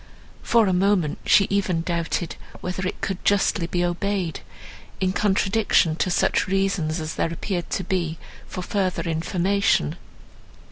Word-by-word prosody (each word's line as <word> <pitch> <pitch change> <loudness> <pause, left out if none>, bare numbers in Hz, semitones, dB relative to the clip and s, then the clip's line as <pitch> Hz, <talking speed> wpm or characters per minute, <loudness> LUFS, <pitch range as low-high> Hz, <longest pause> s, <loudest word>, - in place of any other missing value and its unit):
For 230 -2 +3
a 190 - +1
moment, 180 -4 +2
she 200 - +6
even 190 -4 +1
doubted, 170 -1 -2 0.2
whether 180 +1 -3
it - - -5
could 195 -1 -3
justly 200 -3 +2
be 175 0 0
obeyed, 180 -1 -2 0.6
in 185 0 +1
contradiction 200 -4 +2
to 185 - 0
such 175 - +2
reasons 185 -4 0
as 155 0 -4
there 165 - -1
appeared 175 +1 -3
to 190 - -2
be 170 -3 -1 0.3
for 185 - -5
further 190 -1 -1
information. 170 - +1
185 Hz, 140 wpm, -24 LUFS, 170-195 Hz, 0.6 s, she